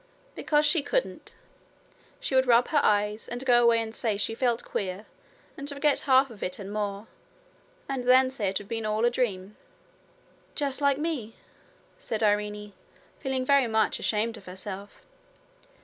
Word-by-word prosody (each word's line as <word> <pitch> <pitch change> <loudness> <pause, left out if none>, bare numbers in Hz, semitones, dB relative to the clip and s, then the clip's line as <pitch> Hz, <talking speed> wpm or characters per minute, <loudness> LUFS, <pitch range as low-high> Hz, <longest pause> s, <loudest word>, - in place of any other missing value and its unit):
'Because 300 0 +1
she 320 +1 +3
couldn't. - - -3 0.8
She - - -4
would 260 0 +4
rub 240 0 +4
her 300 - +3
eyes, 210 +1 +1
and 245 +2 -6
go 240 -2 +5
away 235 -1 +4
and 225 -1 -4
say 220 -3 -1
she 210 - -1
felt 240 0 0
queer, 195 +1 -4 0.5
and 285 -1 -6
forget 285 0 +1
half 265 0 +5
of 210 - -13
it 180 - -3
and 200 0 -7
more, 205 0 -3 0.8
and 265 -3 -3
then 260 +1 +5
say 215 -7 -1
it 195 - -1
had 205 - -8
been 225 -1 -3
all 215 +2 +1
a 240 - +3
dream.' 210 -5 -2 1.0
'Just 280 -1 -2
like 280 -1 +3
me,' 290 -8 -3 0.6
said 220 -1 -3
Irene, 210 0 0 0.5
feeling 265 -2 -2
very 280 -2 +4
much 220 -1 +1
ashamed 225 +2 -1
of 200 - -15
herself. 190 +2 -8
230 Hz, 165 wpm, -27 LUFS, 210-265 Hz, 1.0 s, go